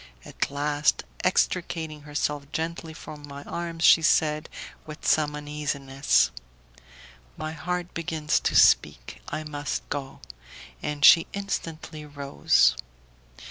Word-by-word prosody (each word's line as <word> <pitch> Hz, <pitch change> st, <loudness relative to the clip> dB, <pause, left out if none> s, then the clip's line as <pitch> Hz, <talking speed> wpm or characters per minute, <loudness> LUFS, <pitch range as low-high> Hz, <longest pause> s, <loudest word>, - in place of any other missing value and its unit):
At -, -, -3 dB
last, 145 Hz, +1 st, 0 dB, 0.2 s
extricating 160 Hz, -4 st, 0 dB
herself 145 Hz, -1 st, -3 dB
gently 165 Hz, 0 st, -4 dB
from 155 Hz, -1 st, -10 dB
my 140 Hz, 0 st, -9 dB
arms, 170 Hz, 0 st, -5 dB
she 165 Hz, -, +7 dB
said, 155 Hz, -1 st, +2 dB, 0.4 s
with 155 Hz, -1 st, -9 dB
some 150 Hz, -1 st, +2 dB
uneasiness, 145 Hz, -2 st, 0 dB, 1.1 s
"My 155 Hz, -, -4 dB
heart 175 Hz, +3 st, -4 dB
begins 160 Hz, -2 st, -1 dB
to -, -, -1 dB
speak, -, -, +3 dB
I 155 Hz, -, -4 dB
must 145 Hz, -1 st, -4 dB
go;" 140 Hz, -2 st, -5 dB, 0.6 s
and 145 Hz, -1 st, 0 dB
she 165 Hz, -, +8 dB
instantly 165 Hz, -5 st, -5 dB
rose. 145 Hz, -2 st, +2 dB
150 Hz, 110 wpm, -26 LUFS, 145-160 Hz, 1.1 s, she